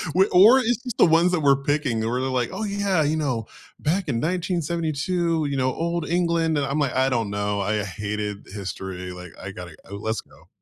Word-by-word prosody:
We 190 +1 +6
or 215 +9 +7
it's 245 -2 +1
just 245 -4 -5
the - - +7
ones 170 +2 +4
that 175 - +1
we're 140 -1 +4
picking 145 -6 0
where 115 +3 -1
they're 130 - -1
like, 125 -2 0
"Oh, 205 +4 -4
yeah. 200 -5 +1
You 155 +2 +1
know, 125 -7 -1 0.3
back 175 +5 0
in 135 - -1
1972, 170 0 -1
you 140 -1 -2
know, 130 -1 +1
Old 170 0 -2
England," 170 -2 +1
and 145 - +1
I'm 140 +2 -1
like, 140 -4 0
"I 130 +1 +3
don't 115 -5 0
know, 100 0 -1
I 105 +1 0
hated 105 +2 -4
history, 95 -2 -6
like, 90 -1 -9
I 95 - -6
gotta 90 -3 -9
uh, 100 - -6
let's 110 +2 -3
go." - - -22
145 Hz, 215 wpm, -24 LUFS, 105-170 Hz, 0.3 s, or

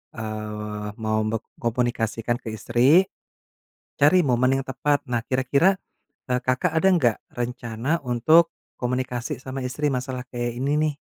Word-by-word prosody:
eee, 105 -1 -5
mau 110 -1 -1
bek 110 0 -2 0.2
komunikasikan 120 -1 -1
ke 110 -3 -6
istri, 130 - +4 1.0
cari 160 +4 +6
momen 130 +1 +3
yang - - -18
tepat. 145 +2 0
Nah, 120 - +2
kira-kira, 140 +9 +3 0.5
eee, 125 -1 0
Kakak 130 +6 0
ada 175 +4 +4
enggak 125 -11 +3
rencana 120 +5 -2
untuk 155 +8 +4 0.2
komunikasi 125 -1 -2
sama 130 0 -6
istri 140 +4 -1
masalah 130 -1 -3
kayak 120 -1 -3
ini 140 +2 0
nih? 150 -1 +1
125 Hz, 135 wpm, -24 LUFS, 115-140 Hz, 1.0 s, cari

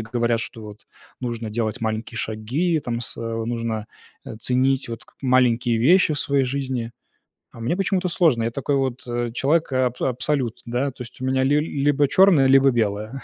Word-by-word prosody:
говорят, 115 +1 0
что 115 -1 -7
вот 105 0 -12 0.3
нужно 120 -3 -4
делать 110 -1 -2
маленькие 110 +1 -3
шаги, 125 +12 -1
там 120 -3 -3
сэ 120 - -6 0.3
нужно, 115 -2 -3 0.4
э, 120 -5 -7
ценить 130 +3 +1
вот 115 -1 -7
к - - -25
маленькие 125 -3 +2
вещи 165 +7 +4
в 145 - -2
своей 140 -1 +1
жизни. 130 -3 -3 0.6
А - - -13
мне 160 +10 -1
почему-то 190 -1 0
сложно. 160 -9 +2
Я 115 - -1
такой 140 +3 -1
вот 130 -2 -1 0.3
человек 145 +6 +1
аб 125 -1 0
абсолют, 130 -1 -1
да. 125 +4 -1
То 125 - -14
есть 120 +1 -14
у - - -2
меня 130 0 +1
ли 145 +3 +3
либо 145 -1 +1
черное, 185 -4 +5
либо 135 0 +5
белое. 110 +2 -2
125 Hz, 175 wpm, -22 LUFS, 115-140 Hz, 0.6 s, черное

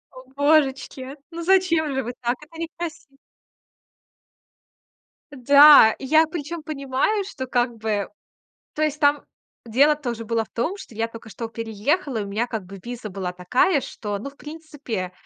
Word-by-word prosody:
О, - - -10 0.2
божечки, 280 -2 +1 0.2
ну 335 0 -6
зачем 335 -5 +2
же 265 -1 -1
вы 245 +2 -5
так? 240 +1 0
Это 325 +2 -13
некраси 330 -3 -6 2.2
Да, 280 -2 +8
и 270 - -7
я 315 +3 +5
причём 320 0 -6
понимаю, 290 +7 -1
что 260 -9 -6
как 240 -2 -1
бы 215 -2 -2 0.7
то 305 - -4
есть 305 -1 0
там 290 0 +3 0.4
дело 280 +7 +4
тоже 240 -6 -5
было 225 0 0
в - - -18
том, 310 +12 -2
что 240 - -12
я 225 +1 -1
тока 230 0 -12
что 230 +2 -6
переехала. 230 - -2
И - - -2
у - - -7
меня 215 +4 -1
как 220 -6 -5
бы 195 +1 -11
виза 235 -3 -7
была 185 -1 -4
такая, 250 - +2
что, 205 -2 -5
ну, 275 - -6
в 280 - -21
принципе, 295 - -6
265 Hz, 165 wpm, -23 LUFS, 225-305 Hz, 2.2 s, Да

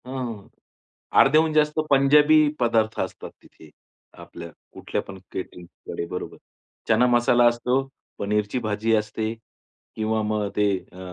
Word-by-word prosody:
हं. 125 -6 -6 0.7
अर्ध्याहून 155 +3 +4
जास्त 150 0 +1
पंजाबी 145 +3 +5 0.2
पदार्थ 115 -2 +1
असतात - - -5
तिथे. 80 - -18 0.5
आपल्या 85 - -10 0.2
कुठल्या - - -4
पण 95 -1 -11
कॅटरिंगकडे 90 -2 -7
बरोबर. 90 +1 -6 0.5
चना 115 +2 +4
मसाला 120 0 +3
असतो, 125 +3 0 0.4
पनीरची 105 +3 -1
भाजी 110 +2 0
असते 110 +1 -2 0.6
किंवा 110 0 -1
मग 105 -1 -1
ते 105 0 +3 0.2
अ, 90 - -14
110 Hz, 120 wpm, -23 LUFS, 105-130 Hz, 0.7 s, पंजाबी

